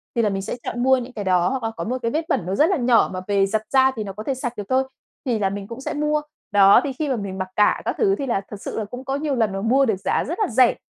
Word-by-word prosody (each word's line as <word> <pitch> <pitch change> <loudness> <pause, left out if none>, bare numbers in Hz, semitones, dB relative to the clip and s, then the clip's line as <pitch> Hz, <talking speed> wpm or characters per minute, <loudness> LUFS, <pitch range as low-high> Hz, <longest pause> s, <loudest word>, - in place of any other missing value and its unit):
thì 235 - +2
là 215 - +2
mình 195 -1 -2
sẽ 195 - -4
chọn 240 +1 -3
mua 265 0 +5
những 250 0 -6
cái 210 - -5
đó, 180 -2 +2
hoặc 265 -2 -3
là 225 - -1
có - - -3
một 250 +3 -2
cái 230 - -1
vết 315 +4 -1
bẩn 180 - 0
nó 185 +2 -2
rất 305 - +4
là 380 - +2
nhỏ 240 -3 +3
mà 185 - -4
về 200 -1 +3
giặt 210 +2 -1
ra 265 0 +5
thì 220 - -3
nó 195 -2 -6
có 210 +2 -7
thể 270 - -1
sạch 250 -2 -4
được 205 - -3
thôi, 260 +1 +3 0.4
thì 240 -4 0
là 195 -2 +1
mình 200 0 -6
cũng 235 +4 -8
sẽ - - -4
mua. 300 0 0 0.3
Đó, 200 +3 +7
thì 280 - -3
khi 295 +3 -3
mà 265 - +1
mình 200 -4 -5
mặc 185 -1 -3
cả 210 - +3
các - - -1
thứ 395 -3 +3
thì 280 - -4
là 215 -5 0
thực 205 -2 -8
sự - - -4
là 215 - -3
cũng 250 +5 -9
có 270 - -1
nhiều 285 -1 -1
lần 225 -4 +1
mà 195 - -3
mua 260 +6 +3
được 220 -6 0
giá 195 - 0
rất 340 +7 -4
là 425 - +2
rẻ 250 -3 +4
235 Hz, 340 wpm, -22 LUFS, 200-265 Hz, 0.4 s, Đó